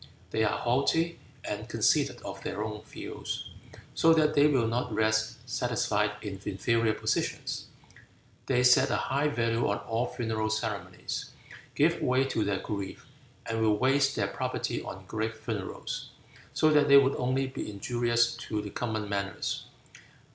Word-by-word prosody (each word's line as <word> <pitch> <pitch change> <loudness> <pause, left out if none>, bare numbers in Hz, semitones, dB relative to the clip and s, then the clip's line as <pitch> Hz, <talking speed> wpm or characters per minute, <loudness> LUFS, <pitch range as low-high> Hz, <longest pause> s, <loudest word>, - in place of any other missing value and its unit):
They 110 - +1
are 110 - +1
haughty 150 +7 +1 0.2
and - - -5
conceited - - +2
of - - -7
their 105 - -3
own 105 -1 -5
views, - - -6 0.4
so 165 0 +5
that 155 -1 +3
they 145 0 +6
will 130 -6 +3
not 115 +2 -1
rest 110 +2 0
satisfied 110 -5 0
in 95 -3 -6
inferior 115 +3 +1
positions. - - -2 0.8
They 125 -2 +3
set 125 0 +6
a - - +1
high 140 +3 +1
value 115 -4 +1
on 100 - +1
all 115 +4 -1
funeral 110 -3 -1
ceremonies, 105 -4 -3 0.5
give - - +3
way 130 +1 +3
to 110 - +1
their 100 -2 -1
grief, 100 -3 -5 0.4
and 115 0 -2
will 110 -1 +3
waste 135 +3 +3
their - - +1
property - - -2
on 95 0 -8
great 110 +2 -2
funerals, 110 -4 -5 0.4
so 155 - +3
that 150 -1 +5
they 140 0 +9
would 140 0 +5
only 130 +2 +1
be 130 -4 -5
injurious 120 +3 +1
to 110 - -3
the 105 -1 -5
common 110 -3 -2
manners. 100 0 -2
115 Hz, 155 wpm, -29 LUFS, 105-130 Hz, 0.8 s, they